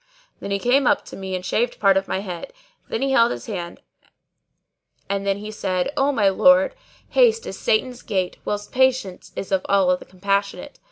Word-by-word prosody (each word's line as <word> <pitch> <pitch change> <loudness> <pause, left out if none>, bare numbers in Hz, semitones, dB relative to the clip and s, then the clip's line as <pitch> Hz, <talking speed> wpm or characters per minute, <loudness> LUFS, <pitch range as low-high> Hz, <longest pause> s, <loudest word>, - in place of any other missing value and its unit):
Then - - -6
he 200 - 0
came 250 +5 +2
up - - +2
to - - -10
me 190 -1 -5
and 180 0 -5
shaved 235 +6 -1
part 195 -2 +4
of 195 0 0
my 190 - -2
head; 180 - -7 0.4
then - - -2
he 275 - 0
held 235 -3 +5
his - - -5
hand 175 -6 -6 1.3
and 200 0 -2
then 195 0 +1
he 210 +1 -7
said, 185 +3 -2
"O 275 +1 +2
my 215 -7 +2
lord, 275 - +5 0.4
haste 455 -2 +3
is - - -7
Satan's 260 - 0
gait 190 -4 -2
whilst 205 0 -4
patience 260 -8 0
is 195 - -6
of 190 -1 +1
Allah 185 -2 +3
the - - -12
Compassionate. 200 +5 -2
200 Hz, 190 wpm, -22 LUFS, 190-260 Hz, 1.3 s, held